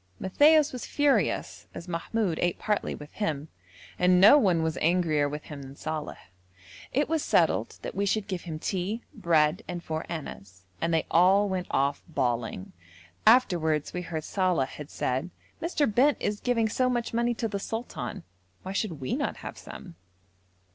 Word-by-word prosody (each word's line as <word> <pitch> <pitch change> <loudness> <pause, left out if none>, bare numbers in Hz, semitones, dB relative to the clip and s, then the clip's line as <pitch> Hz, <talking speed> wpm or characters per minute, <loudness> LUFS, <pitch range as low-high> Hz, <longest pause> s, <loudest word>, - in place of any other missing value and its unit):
Matthaios 295 +9 +4
was 250 - -6
furious, 290 -1 0
as 170 - -8
Mahmoud 175 +1 -1
ate 175 -1 0
partly 210 -1 -1
with 150 0 -11
him, 155 -7 -3 0.5
and 180 0 +5
no 205 +9 +9
one 185 - +3
was 160 -1 -1
angrier 160 -4 +2
with 150 +1 -6
him 145 -2 -9
than 135 0 -10
Saleh. 155 0 -5 0.7
It 290 +3 +1
was 320 -1 0
settled - - +2
that - - -5
we 200 +1 -1
should 210 0 0
give 185 -4 -3
him 160 -3 -6
tea, 195 +7 -3
bread, 165 -2 +2
and 175 -1 -5
four 160 0 -3
annas, 95 - -8 0.2
and 165 - 0
they 165 -1 +1
all 190 +4 +5
went 185 -2 -2
off 140 +1 0
bawling. 120 - -2 0.5
Afterwards 170 - +3
we 180 - -3
heard 165 -3 -5
Saleh 180 -9 0
had 150 -1 -9
said, 130 +7 -2 0.3
'Mr. 305 - 0
Bent 275 +6 +4
is 205 0 -2
giving 235 -3 +1
so 255 +3 +1
much 240 -2 -2
money 235 +1 +1
to 230 - -2
the 200 -2 -3
sultan, 210 - -5 0.4
why 190 - -5
should 195 -7 -2
we 130 - -1
not - - -2
have - - -6
some?' - - -10
180 Hz, 170 wpm, -27 LUFS, 155-220 Hz, 0.7 s, no